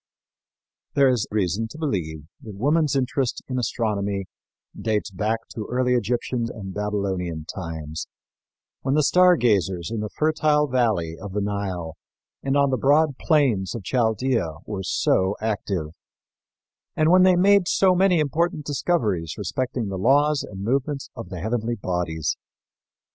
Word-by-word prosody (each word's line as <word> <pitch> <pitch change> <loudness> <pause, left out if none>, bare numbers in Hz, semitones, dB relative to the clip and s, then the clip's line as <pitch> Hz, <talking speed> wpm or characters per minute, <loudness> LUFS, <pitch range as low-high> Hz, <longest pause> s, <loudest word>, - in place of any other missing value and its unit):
There 140 -2 +5
is 125 -5 +1
reason 105 +1 0
to 115 - -11
believe 85 - -3 0.2
that 105 -3 -9
woman's 145 +6 +2
interest 130 -1 -1
in 130 -1 -2
astronomy 100 -5 -1 0.5
dates 105 -2 -1
back 110 +4 -2
to 110 - -6
early 125 0 +1
Egyptian 120 +1 -1
and 95 -3 -7
Babylonian 95 -6 -2
times 80 -3 -6 0.7
when 135 +1 0
the 155 - +3
star 180 +3 +5
gazers 95 - +1
in 115 - -2
the 105 0 -3
fertile 150 0 +2
valley 110 - 0
of 100 -1 -7
the 105 - 0
Nile 95 -5 -3 0.4
and 135 +1 0
on 140 -1 +3
the 130 - +1
broad 145 +1 +3
plains 130 - +2
of 115 - -6
Chaldea 110 -5 0
were 100 -3 -4
so 95 +1 +1
active, 100 -7 -2 1.1
and 155 +1 +3
when 185 0 +7
they 185 0 +6
made 195 0 +4
so 190 0 +4
many 180 -1 +3
important 155 +2 0
discoveries 110 - 0
respecting 125 -4 -2
the 95 -1 -4
laws 145 +6 +3
and 95 -1 -7
movements 135 +4 -1
of 115 - -8
the 90 -4 -6
heavenly 115 +2 -1
bodies. 90 -6 -2
115 Hz, 145 wpm, -24 LUFS, 95-140 Hz, 1.1 s, when